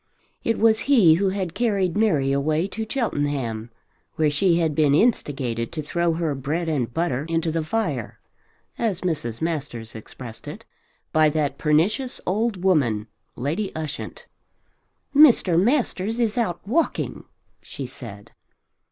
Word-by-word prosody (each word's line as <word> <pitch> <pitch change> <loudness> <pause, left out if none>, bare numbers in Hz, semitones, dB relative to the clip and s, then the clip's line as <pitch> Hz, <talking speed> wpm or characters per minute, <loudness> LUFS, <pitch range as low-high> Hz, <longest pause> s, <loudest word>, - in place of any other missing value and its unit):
It 230 - 0
was 220 0 +4
he 215 - +7
who 190 +4 +2
had 190 -3 -3
carried 200 -7 0
Mary 155 -11 +2
away 155 +5 +1
to 220 +1 -5
Cheltenham 145 - -2 0.5
where 155 -2 +2
she 170 +4 +3
had 160 -3 +1
been 145 -1 +3
instigated 135 - 0
to 155 -2 -4
throw 170 +2 0
her 160 -2 -1
bread 150 +6 -2
and 135 -7 -1
butter 145 -2 -1
into 165 0 0
the 165 0 -1
fire, 225 +8 -2 0.6
as 210 -6 -1
Mrs. 150 -9 -2
Masters 140 -9 -3
expressed 115 +1 -10
it, - - -8 0.5
by 155 -1 +5
that 145 -2 -1
pernicious 185 - +1
old 205 0 -1
woman 125 - +2 0.3
Lady 160 - -2
Ushant. 155 -2 -6 0.9
"Mr. 230 - +6
Masters 225 -3 0
is 225 -3 +1
out 205 -7 -2
walking," 310 +9 -1 0.4
she 135 - -7
said. 115 -6 -10
165 Hz, 135 wpm, -23 LUFS, 140-200 Hz, 0.9 s, he